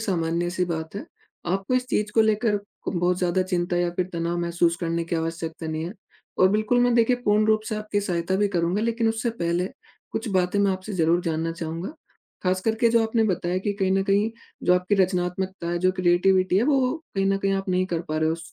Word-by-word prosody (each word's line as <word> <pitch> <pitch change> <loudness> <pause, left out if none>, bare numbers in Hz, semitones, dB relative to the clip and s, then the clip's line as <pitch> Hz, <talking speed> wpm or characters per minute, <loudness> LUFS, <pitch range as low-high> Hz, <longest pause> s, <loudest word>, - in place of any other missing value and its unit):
सामान्य-सी 175 -2 -1
बात 160 -1 -4
है। 205 - -5 0.5
आपको 195 +6 -1
इस 255 0 +1
चीज़ 210 -3 -1
को 225 - +5
लेकर 215 -1 +2 0.3
बहुत 175 0 +1
ज़्यादा 185 +1 +1
चिंता 175 -1 -1
या 175 0 +1
फ़िर 185 -1 0
तनाव 170 0 -2
महसूस 170 0 +1
करने 170 -1 -1
की 170 - -2
आवश्यकता 165 0 -4
नहीं 160 0 -3
है। 175 - -5 0.5
और 185 - +6
बिल्कुल 215 +4 +2
मैं 245 0 +3
देखिए 235 +1 +4
पूर्ण 210 +1 +3
रूप 215 0 +3
से - - -2
आपकी 210 -1 -2
सहायता 180 -1 -1
भी 205 +1 +2
करूँगा 180 +2 0
लेकिन 230 0 +1
उससे 225 +2 -1
पहले 170 +2 0 0.4
कुछ 225 - -3
बातें 185 +1 +1
मैं 200 -1 +3
आपसे 190 +3 -6
ज़रूर 170 0 +2
जानना 165 0 -1
चाहूँगा। 165 +1 -5 0.5
ख़ास 185 0 +1
करके 225 +3 +2
जो 230 -1 +4
आपने 225 0 +1
बताया 180 -2 0
कि 205 - +2
कहीं 195 -2 -1
न 195 - +2
कहीं 205 +2 +2 0.3
जो 180 - +4
आपकी 180 +3 +1
रचनात्मकता 180 0 -2
है 175 - 0
जो 185 +1 +2
क्रिएटिविटी 185 +1 +3
है 215 - +2
वो 265 -3 +2 0.2
कहीं 195 0 +1
न 195 - +2
कहीं 195 0 0
आप 195 0 -3
नहीं 185 0 +1
कर 170 -3 -2
पा 155 - -1
रहे 155 - +2
हो 160 - +2
उस 165 0 -8
185 Hz, 220 wpm, -24 LUFS, 170-210 Hz, 0.5 s, और